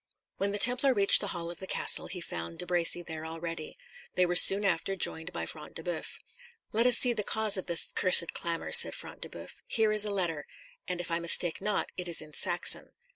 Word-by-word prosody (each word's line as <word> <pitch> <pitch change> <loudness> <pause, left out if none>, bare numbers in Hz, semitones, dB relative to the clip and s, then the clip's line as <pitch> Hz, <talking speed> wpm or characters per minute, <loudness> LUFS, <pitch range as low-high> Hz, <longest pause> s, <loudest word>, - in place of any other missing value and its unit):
When 200 +1 -3
the 205 - -5
Templar 250 +4 +3
reached 200 -1 +4
the - - -4
hall 170 -1 -7
of 175 - -5
the 190 - -9
castle, - - 0
he 180 - -8
found 170 - -8
De 180 - -2
Bracy 175 0 0
there 160 -2 -9
already. 165 0 -8 0.4
They 180 - +1
were 175 0 -4
soon 195 +3 +5
after 195 +1 -3
joined 165 -1 -1
by - - -7
Front 150 -1 -5
de 165 - -7
Boeuf. 175 -2 -7 0.5
"Let 230 +3 0
us 250 - +5
see 245 -1 +3
the 220 - -4
cause 220 0 +1
of 190 - -3
this 170 -2 +1
cursed 180 -2 +4
clamour," 170 -1 -4
said - - +7
Front - - -10
de - - -8
Boeuf. - - -13
"Here 220 -2 -1
is 215 -1 +4
a 210 - -2
letter, 175 -7 -4 0.4
and 180 -1 -5
if 170 - -7
I 165 - -2
mistake 170 0 +4
not, 210 -1 -3
it 180 -1 -6
is 170 - -2
in 155 -1 -5
Saxon." - - 0
180 Hz, 230 wpm, -27 LUFS, 165-200 Hz, 0.5 s, said